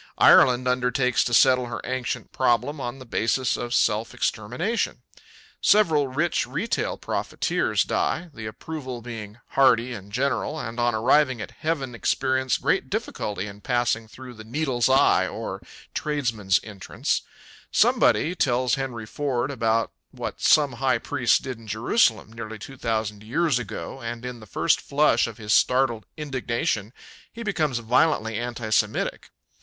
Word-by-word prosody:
Ireland 125 Hz, 0 st, +6 dB
undertakes 125 Hz, 0 st, +2 dB
to 120 Hz, -, -2 dB
settle 125 Hz, -1 st, +5 dB
her 115 Hz, -1 st, -5 dB
ancient 130 Hz, -1 st, -3 dB
problem 130 Hz, +3 st, +1 dB
on 120 Hz, +1 st, -4 dB
the 130 Hz, -, -11 dB
basis 120 Hz, +2 st, 0 dB
of 120 Hz, -, -5 dB
self 110 Hz, -1 st, +1 dB
extermination. 125 Hz, -, -2 dB, 0.6 s
Several 160 Hz, -9 st, +4 dB
rich 155 Hz, +7 st, 0 dB
retail 230 Hz, -, -2 dB
profiteers -, -, -1 dB
die, 170 Hz, 0 st, -1 dB
the 110 Hz, -4 st, -7 dB
approval 130 Hz, +1 st, -7 dB
being 110 Hz, -3 st, -8 dB
hearty 125 Hz, -2 st, +3 dB
and 100 Hz, -2 st, -9 dB
general, 140 Hz, +5 st, -1 dB
and 115 Hz, -3 st, -5 dB
on 120 Hz, -1 st, +2 dB
arriving 130 Hz, +3 st, +3 dB
at 110 Hz, -, -6 dB
heaven 145 Hz, -6 st, -3 dB
experience 130 Hz, +1 st, 0 dB
great -, -, 0 dB
difficulty 100 Hz, -2 st, -3 dB
in 100 Hz, 0 st, -10 dB
passing 120 Hz, -2 st, 0 dB
through 125 Hz, +2 st, -11 dB
the 110 Hz, -1 st, -11 dB
Needle's 125 Hz, +1 st, 0 dB
Eye, 135 Hz, +1 st, +4 dB
or -, -, -5 dB, 0.3 s
tradesmen's 120 Hz, -11 st, 0 dB
entrance. 100 Hz, -3 st, -3 dB, 0.5 s
Somebody 165 Hz, -, +3 dB
tells 125 Hz, -6 st, +1 dB
Henry 130 Hz, -5 st, -3 dB
Ford 130 Hz, +2 st, -2 dB
about 115 Hz, -3 st, 0 dB, 0.2 s
what -, -, -6 dB
some 145 Hz, -3 st, +5 dB
high 130 Hz, -2 st, +3 dB
priests 120 Hz, 0 st, +2 dB
did 130 Hz, -4 st, -6 dB
in 115 Hz, -, -14 dB
Jerusalem 110 Hz, -, +1 dB
nearly 110 Hz, -1 st, -7 dB
two 135 Hz, +6 st, -10 dB
thousand 110 Hz, -4 st, -2 dB
years 135 Hz, +4 st, +1 dB
ago 125 Hz, +3 st, -7 dB
and 120 Hz, +1 st, -5 dB
in 125 Hz, -1 st, -6 dB
the 110 Hz, -, -13 dB
first -, -, +1 dB
flush 150 Hz, -2 st, +2 dB
of 115 Hz, -, -9 dB
his 105 Hz, -2 st, -1 dB
startled 125 Hz, -4 st, +2 dB
indignation 125 Hz, -7 st, -2 dB, 0.4 s
he 230 Hz, -, -8 dB
becomes 155 Hz, -, 0 dB
violently 115 Hz, -1 st, +1 dB
anti 120 Hz, -2 st, -4 dB
Semitic. -, -, 0 dB
125 Hz, 145 wpm, -24 LUFS, 115-135 Hz, 0.6 s, Ireland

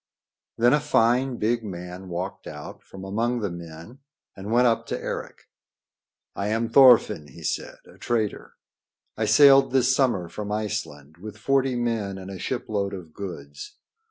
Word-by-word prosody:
Then 120 Hz, +3 st, +4 dB
a 150 Hz, -, +4 dB
fine, 125 Hz, -3 st, +2 dB
big 115 Hz, +2 st, 0 dB
man 90 Hz, -1 st, -8 dB
walked 90 Hz, +3 st, -5 dB
out 75 Hz, -1 st, -9 dB
from 95 Hz, 0 st, -12 dB
among 115 Hz, +5 st, -1 dB
the 100 Hz, -4 st, -2 dB
men 85 Hz, +8 st, -10 dB, 0.4 s
and 95 Hz, +1 st, -8 dB
went 120 Hz, +2 st, +4 dB
up 115 Hz, -1 st, +1 dB
to -, -, -3 dB
Eric. -, -, -6 dB, 0.9 s
"I 100 Hz, -, -2 dB
am 115 Hz, +2 st, -1 dB
Thorfinn," 115 Hz, -, +6 dB
he 65 Hz, -, -13 dB
said, -, -, -3 dB
"a -, -, -18 dB
trader. 110 Hz, -4 st, -2 dB, 0.6 s
I -, -, -1 dB
sailed 135 Hz, -2 st, +6 dB
this 130 Hz, 0 st, +3 dB
summer 120 Hz, -11 st, +1 dB
from 105 Hz, +5 st, -6 dB
Iceland 105 Hz, -9 st, -4 dB
with 105 Hz, +3 st, -9 dB
forty 135 Hz, +2 st, +1 dB
men 115 Hz, -5 st, -2 dB
and 95 Hz, 0 st, -8 dB
a 95 Hz, -, -8 dB
shipload 100 Hz, -5 st, -3 dB
of 85 Hz, -4 st, -11 dB
goods. 75 Hz, -8 st, -8 dB
105 Hz, 155 wpm, -25 LUFS, 90-120 Hz, 0.9 s, Thorfinn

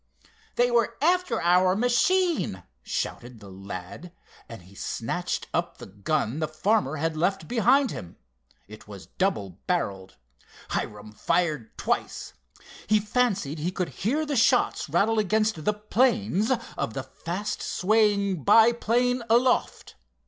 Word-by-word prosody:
"They 245 Hz, 0 st, +2 dB
were 235 Hz, -1 st, +1 dB
after 345 Hz, -6 st, +1 dB
our 180 Hz, +2 st, +3 dB
machine!" 245 Hz, -, +1 dB, 0.2 s
shouted 120 Hz, -, -5 dB
the 100 Hz, -2 st, -12 dB
lad, 95 Hz, -, -8 dB, 0.4 s
and 115 Hz, -6 st, -10 dB
he 95 Hz, +3 st, -17 dB
snatched -, -, -3 dB
up -, -, -2 dB
the -, -, -10 dB
gun 110 Hz, +6 st, -2 dB
the 155 Hz, -, -1 dB
farmer 155 Hz, 0 st, 0 dB
had 160 Hz, +1 st, -2 dB
left 190 Hz, +5 st, -1 dB
behind 250 Hz, +3 st, +3 dB
him. 85 Hz, -, -8 dB, 0.5 s
It 110 Hz, +1 st, -13 dB
was 100 Hz, -3 st, -10 dB
double 105 Hz, -, -2 dB
barreled. 100 Hz, -, -2 dB, 0.5 s
Hiram 105 Hz, 0 st, -4 dB
fired 150 Hz, +1 st, -1 dB
twice. -, -, -2 dB, 0.5 s
He 215 Hz, 0 st, +4 dB
fancied 205 Hz, -, -1 dB
he 170 Hz, +4 st, -2 dB
could 180 Hz, -1 st, -3 dB
hear 290 Hz, +9 st, -1 dB
the 290 Hz, -1 st, -2 dB
shots 245 Hz, -, +2 dB
rattle 210 Hz, +8 st, +2 dB
against 215 Hz, -5 st, 0 dB
the 210 Hz, -, +2 dB
planes 210 Hz, -, +1 dB, 0.2 s
of 110 Hz, -, -3 dB
the 135 Hz, -, -3 dB
fast 175 Hz, +10 st, -5 dB
swaying 200 Hz, -4 st, +1 dB
biplane 235 Hz, -, +4 dB
aloft. 245 Hz, +2 st, +1 dB
190 Hz, 130 wpm, -26 LUFS, -, 0.5 s, He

